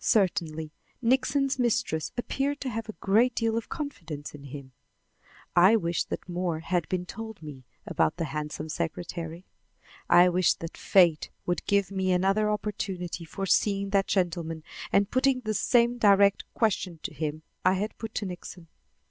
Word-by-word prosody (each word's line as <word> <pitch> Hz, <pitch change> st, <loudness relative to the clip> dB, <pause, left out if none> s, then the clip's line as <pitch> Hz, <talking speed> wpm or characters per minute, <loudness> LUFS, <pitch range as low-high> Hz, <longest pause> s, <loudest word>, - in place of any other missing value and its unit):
Certainly, 160 Hz, -6 st, +1 dB, 0.3 s
Nixon's 265 Hz, +2 st, +1 dB
mistress 205 Hz, -10 st, 0 dB
appeared 275 Hz, +4 st, -1 dB
to 265 Hz, -, -2 dB
have 225 Hz, 0 st, -4 dB
a -, -, -4 dB
great 225 Hz, +6 st, +2 dB
deal 225 Hz, -1 st, +1 dB
of 230 Hz, -, -3 dB
confidence 165 Hz, -, -6 dB
in 145 Hz, -1 st, -11 dB
him. 140 Hz, -1 st, -9 dB, 0.8 s
I 185 Hz, +5 st, +7 dB
wished 170 Hz, -5 st, -1 dB
that -, -, -5 dB
more 175 Hz, -2 st, -2 dB
had 170 Hz, -1 st, -1 dB
been 180 Hz, -1 st, -1 dB
told 220 Hz, -2 st, -8 dB
me 135 Hz, -4 st, -9 dB, 0.2 s
about 80 Hz, -, +1 dB
the 165 Hz, -, -1 dB
handsome 150 Hz, +1 st, -4 dB
secretary. 165 Hz, +2 st, -4 dB, 0.6 s
I 175 Hz, +1 st, +7 dB
wished 180 Hz, 0 st, +2 dB
that 165 Hz, -, -6 dB
fate 175 Hz, -5 st, +3 dB, 0.2 s
would 175 Hz, -2 st, -1 dB
give 200 Hz, -1 st, +2 dB
me 190 Hz, -1 st, 0 dB
another 195 Hz, +4 st, +2 dB
opportunity 190 Hz, -5 st, -3 dB
for 195 Hz, +4 st, -4 dB
seeing 200 Hz, 0 st, +2 dB
that 195 Hz, -1 st, +2 dB
gentleman 165 Hz, -4 st, -1 dB, 0.3 s
and 200 Hz, +1 st, +3 dB
putting 260 Hz, 0 st, +2 dB
the 215 Hz, -2 st, -2 dB
same 240 Hz, +2 st, +3 dB
direct 200 Hz, -2 st, +4 dB
question 190 Hz, -6 st, 0 dB
to -, -, -4 dB
him 155 Hz, 0 st, -4 dB, 0.2 s
I 185 Hz, +1 st, +4 dB
had 210 Hz, +3 st, -3 dB
put 225 Hz, -1 st, -6 dB
to 210 Hz, -, -1 dB
Nixon. 180 Hz, -2 st, -8 dB
185 Hz, 160 wpm, -28 LUFS, 165-220 Hz, 0.8 s, I